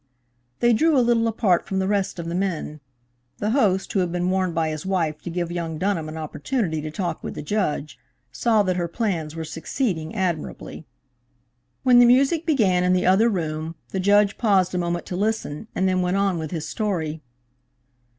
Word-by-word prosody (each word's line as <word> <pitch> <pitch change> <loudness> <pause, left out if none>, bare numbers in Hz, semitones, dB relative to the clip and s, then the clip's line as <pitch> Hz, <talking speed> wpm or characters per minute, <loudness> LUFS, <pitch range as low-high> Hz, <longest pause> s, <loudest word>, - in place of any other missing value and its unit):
They 240 0 +5
drew 310 +5 +3
a 250 - +4
little 230 -1 +3
apart 205 -5 +1
from 190 - -2
the 190 0 0
rest 200 -2 0
of 170 -1 -5
the 170 - -3
men. 175 -5 -2 0.6
The 210 +1 -1
host, 200 -7 +1
who 195 - +2
had 180 -2 0
been 180 +1 0
warned 185 -2 0
by 160 -1 +1
his 155 -1 -4
wife 165 -5 -1
to - - -6
give 175 0 -3
young 165 -2 -3
Dunham 170 -3 -1
an 155 - -7
opportunity 160 - -2
to 155 - -5
talk 170 0 -4
with - - -5
the - - -6
Judge, 150 - -2 0.3
saw 215 - +2
that 185 -2 0
her 175 -1 -1
plans 170 -5 -2
were 165 - -4
succeeding 165 - -3
admirably. 175 -4 -3 1.0
When 250 -2 +6
the 245 - +7
music 275 +7 +3
began 200 - +3
in 180 0 +3
the 180 0 +1
other 195 +6 +4
room 160 -4 -3
the 190 - -3
Judge 205 +2 +3
paused 195 -6 +3
a 180 - 0
moment 175 0 -2
to 180 - -5
listen, 210 -3 -2
and 190 - +1
then 185 0 +1
went 180 +2 0
on 195 -3 +1
with 160 -1 -4
his 160 -3 -4
story. 160 -8 -2
185 Hz, 200 wpm, -23 LUFS, 165-210 Hz, 1.0 s, the